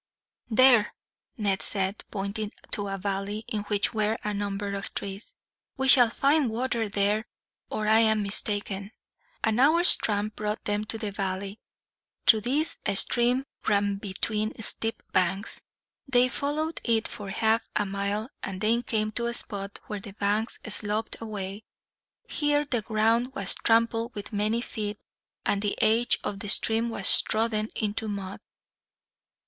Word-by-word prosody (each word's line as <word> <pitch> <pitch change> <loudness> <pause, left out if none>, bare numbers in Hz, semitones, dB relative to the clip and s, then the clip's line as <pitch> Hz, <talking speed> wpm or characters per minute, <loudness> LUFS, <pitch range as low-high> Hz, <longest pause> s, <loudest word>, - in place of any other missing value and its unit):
"There," 240 -2 +5 0.4
Ned 200 -3 0
said, 195 0 0
pointing 205 +1 -4 0.2
to 205 -2 -2
a 195 0 -3
valley 200 +2 -3
in 215 - -3
which 205 +1 0
were 215 0 0
a 210 - -2
number 200 0 -3
of 200 0 -5
trees. 195 +2 -6 0.4
"We 265 0 0
shall 245 -3 +7
find 280 +2 +2
water 230 -1 -2
there, 205 +3 0 0.4
or 215 0 -2
I 220 +1 +5
am 220 -2 +3
mistaken." 200 0 0 0.5
An 220 +1 +1
hour's 325 +6 +6
tramp 210 0 -2
brought 210 +1 -3
them 210 +1 -1
to 225 - -4
the 215 -2 -4
valley. 195 +1 -4 0.7
Through 220 -2 +6
this 285 +8 0
a - - -1
stream 245 +6 +3 0.2
ran 200 0 +2
between 210 +2 -3
steep 225 +1 -1
banks. 185 +3 0 0.5
They 250 -1 +3
followed 300 +4 -2
it 225 -2 +1
for 205 -2 -8
half 220 +3 +1
a 205 - +1
mile, 200 +2 -3
and 190 -1 -5
then 225 +3 +2
came 215 -3 -1
to 235 +2 -2
a 235 - -2
spot 200 -3 -2
where 210 -2 -5
the 195 0 -10
banks 210 +3 0
sloped 215 +2 -1
away. 205 -2 -6 0.6
Here 295 0 +1
the 245 -5 -1
ground 225 +4 +1
was 195 -1 +1
trampled 230 0 +1
with 205 +1 -7
many 215 +3 0
feet, 210 -3 -5 0.5
and 200 - +1
the 205 -1 -2
edge 230 +2 +3
of 200 - -4
the 205 - -5
stream 225 +3 +2
was 195 -4 +9
trodden 220 -1 0
into 215 0 -2
mud. 200 -2 -5
215 Hz, 155 wpm, -27 LUFS, 200-230 Hz, 0.7 s, was